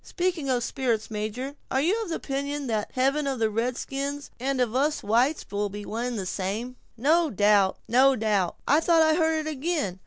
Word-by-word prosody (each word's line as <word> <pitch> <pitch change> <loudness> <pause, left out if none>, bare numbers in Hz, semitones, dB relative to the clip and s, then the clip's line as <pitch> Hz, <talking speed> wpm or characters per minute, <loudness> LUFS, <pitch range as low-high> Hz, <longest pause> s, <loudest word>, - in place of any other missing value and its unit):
Speaking 350 -6 -2
of 245 -2 +1
spirits, 235 -5 -1
major, 225 +7 -4
are 265 - +1
you 390 +11 +1
of 410 - -7
opinion 280 -2 -3
that 220 -4 -1
the - - -31
heaven 275 +3 +2
of 265 -3 -2
a 220 -1 +1
red 235 +3 -1
skin 280 +1 -3 0.2
and 265 +1 -1
of 240 -3 +1
us 290 +4 +1
whites 245 +9 +2
will 205 0 -1
be 205 +1 -7
of - - -9
one 230 +3 -2
and 245 -2 -3
the 195 - -3
same?" 205 +7 -3 0.2
"No 315 +7 +3
doubt—no 210 +5 +3
doubt. 210 -6 0
I 295 +3 +5
thought 330 0 +4
I 315 0 +4
heard 320 -1 +1
it - - -4
again! 290 - -2
260 Hz, 210 wpm, -26 LUFS, 220-295 Hz, 0.2 s, I